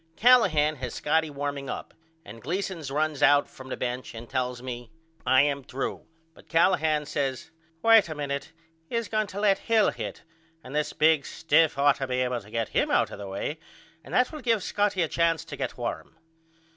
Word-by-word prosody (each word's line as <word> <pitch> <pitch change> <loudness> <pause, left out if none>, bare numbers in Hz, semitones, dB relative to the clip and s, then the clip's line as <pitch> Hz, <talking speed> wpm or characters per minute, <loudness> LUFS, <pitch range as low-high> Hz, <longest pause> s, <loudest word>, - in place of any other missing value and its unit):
Callahan 165 -12 +4
has 125 -2 -5
Scotty 160 +1 +1
warming 140 -1 -4
up - - -6 0.3
and 115 +3 -11
Gleason 180 - -3
runs 150 0 -1
out 145 0 +5
from 130 0 -12
the - - -4
bench 125 -1 -4
and 115 +1 -8
tells 125 -1 -2
me 120 -1 -7 0.4
I 130 +1 +6
am 140 -1 -1
threw 130 +2 -5 0.3
but - - -20
Callahan 160 -3 +3
says 140 -2 -3 0.3
Wait 225 -5 +6
a 155 - -4
minute 140 -1 -4 0.4
he - - -4
is 230 -2 -1
going 215 -1 0
to 195 +1 -6
let 205 -2 +3
Hill 225 -2 +3
hit - - -7 0.4
and 130 +3 -9
this 150 0 0
big 155 -2 +3
stiff 160 -1 +2
ought 140 0 +4
to 135 - -3
be 125 0 0
able 125 -1 -1
to 100 - -16
get 115 0 -2
him - - +1
out - - +2
of - - -8
the 100 - -6
way 100 +11 -4 0.4
and - - -13
that 250 0 +3
will 305 -2 -7
give 230 -6 +1
Scotty 205 -3 +1
a - - 0
chance 165 -1 +1
to 145 - -7
get - - -4
warm. 120 +5 -5
145 Hz, 200 wpm, -27 LUFS, 130-170 Hz, 0.4 s, I